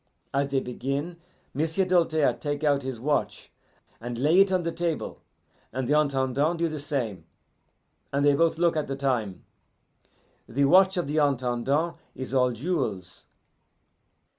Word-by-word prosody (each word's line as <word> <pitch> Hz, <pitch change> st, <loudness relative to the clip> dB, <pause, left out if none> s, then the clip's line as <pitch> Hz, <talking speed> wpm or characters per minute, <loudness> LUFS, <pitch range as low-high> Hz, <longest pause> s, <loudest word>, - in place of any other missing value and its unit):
As 140 Hz, +1 st, +1 dB
they 140 Hz, -1 st, 0 dB
begin, 140 Hz, +7 st, -4 dB, 0.4 s
M'sieu' 160 Hz, +6 st, 0 dB
Doltaire 165 Hz, -5 st, +2 dB
take 145 Hz, 0 st, -4 dB
out 145 Hz, -2 st, +2 dB
his 130 Hz, -3 st, -5 dB
watch 145 Hz, +4 st, -2 dB, 0.5 s
and 120 Hz, +1 st, -5 dB
lay 150 Hz, +8 st, +3 dB
it 195 Hz, 0 st, +5 dB
on 185 Hz, -2 st, +1 dB
the 170 Hz, -, -1 dB
table, 170 Hz, -1 st, -3 dB, 0.5 s
and 130 Hz, 0 st, -3 dB
the 145 Hz, -, +2 dB
Intendant 140 Hz, +2 st, +1 dB
do 170 Hz, 0 st, +1 dB
the 155 Hz, -2 st, -4 dB
same, 120 Hz, -, -3 dB, 0.9 s
and 140 Hz, +1 st, +1 dB
they 145 Hz, -, +5 dB
both 165 Hz, +3 st, +2 dB
look 170 Hz, -1 st, +2 dB
at 155 Hz, -2 st, -1 dB
the 135 Hz, -, -3 dB
time. 120 Hz, -9 st, -2 dB, 1.0 s
The 140 Hz, +5 st, +2 dB
watch 190 Hz, +5 st, +5 dB
of 175 Hz, -, 0 dB
the 150 Hz, +2 st, -3 dB
Intendant 140 Hz, +3 st, 0 dB, 0.2 s
is 130 Hz, 0 st, -6 dB
all 125 Hz, -1 st, +3 dB
jewels. 115 Hz, -, -3 dB
140 Hz, 150 wpm, -26 LUFS, 130-165 Hz, 1.0 s, it